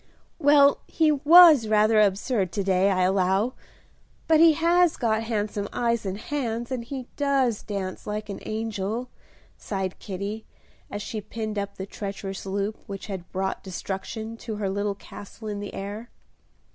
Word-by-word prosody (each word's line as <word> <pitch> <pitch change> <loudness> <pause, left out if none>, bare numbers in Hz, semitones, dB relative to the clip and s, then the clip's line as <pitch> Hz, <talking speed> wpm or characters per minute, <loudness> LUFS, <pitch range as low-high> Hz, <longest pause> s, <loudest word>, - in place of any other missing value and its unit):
"Well, 285 -1 +5
he 315 -2 +2
was 300 -3 +8
rather 215 +1 +4
absurd 200 -1 +1
to 200 - -1
day, 190 0 +3
I 185 -2 +2
allow; 190 +5 +2 0.7
but 320 -1 +5
he 330 -1 +7
has 340 +2 +3
got 220 -3 +1
handsome 210 -2 -2
eyes 235 -3 0
and 190 +1 -3
hands, 235 -2 -3
and 250 -2 -2
he 255 +1 -6
does 270 -6 +1
dance 195 -3 -5
like 210 0 -3
an 200 - -6
angel," 220 +2 -3 0.5
sighed 190 -2 -4
Kitty, 200 +3 -5 0.4
as 205 0 -5
she 215 0 -5
pinned 215 0 -4
up 200 0 -5
the 190 - -4
treacherous 195 -1 -6
loop 200 +2 -2
which 195 -1 -6
had 190 -4 -7
brought 190 +1 -2
destruction 200 +4 -5
to 225 -1 -6
her 200 -2 -2
little 200 0 -1
castle 205 +2 -11
in 205 -1 -3
the 205 - -7
air. 205 +4 -6
215 Hz, 160 wpm, -25 LUFS, 195-240 Hz, 0.7 s, was